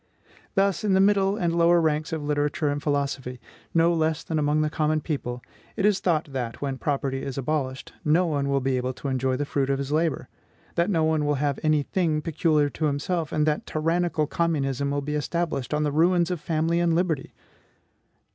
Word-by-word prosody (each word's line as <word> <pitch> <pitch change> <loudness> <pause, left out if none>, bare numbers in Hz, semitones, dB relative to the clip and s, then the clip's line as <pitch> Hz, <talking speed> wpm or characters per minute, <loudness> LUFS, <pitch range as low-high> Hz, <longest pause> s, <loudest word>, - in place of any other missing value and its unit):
Thus, 195 -2 +2
in 205 -2 +2
the - - +4
middle 195 0 +3
and 170 -3 0
lower 170 0 +5
ranks 155 -1 0
of 160 -2 -3
literature 145 0 0
and 145 0 -2
philosophy, 140 -3 -2 0.3
no 165 +1 +3
less 160 -1 0
than 160 -1 -2
among 150 +1 +2
the 155 - +1
common 155 0 +1
people, 125 -6 -4 0.3
it 200 - 0
is 205 -2 +3
thought 160 -6 0
that, 120 -3 -4
when 135 -2 -3
property 135 -2 -1
is 135 -1 -5
abolished, 135 -1 -2
no 165 +4 +3
one 145 -4 -1
will 140 0 +1
be 130 0 0
able 125 +1 -2
to 140 - -5
enjoy 130 0 0
the 145 - -1
fruit 140 -1 -1
of 135 - +1
his 140 +1 -4
labor; 160 0 0 0.5
that 170 +3 +1
no 165 -5 +2
one 155 -1 +2
will 145 0 +1
have 140 0 -1
any 155 -2 +2
thing 160 -2 0
peculiar 155 -1 +1
to 155 +2 -3
himself, 155 +3 -1
and 150 -1 +1
that 150 -1 -1
tyrannical 165 0 0
communism 140 -4 -1
will 145 0 -1
be 150 +2 -4
established 150 -3 -2
on 150 0 +1
the 150 - 0
ruins 170 +3 +3
of 175 -4 -3
family 165 +2 0
and 170 -1 +2
liberty! 165 -5 -1
150 Hz, 205 wpm, -25 LUFS, 140-165 Hz, 0.5 s, lower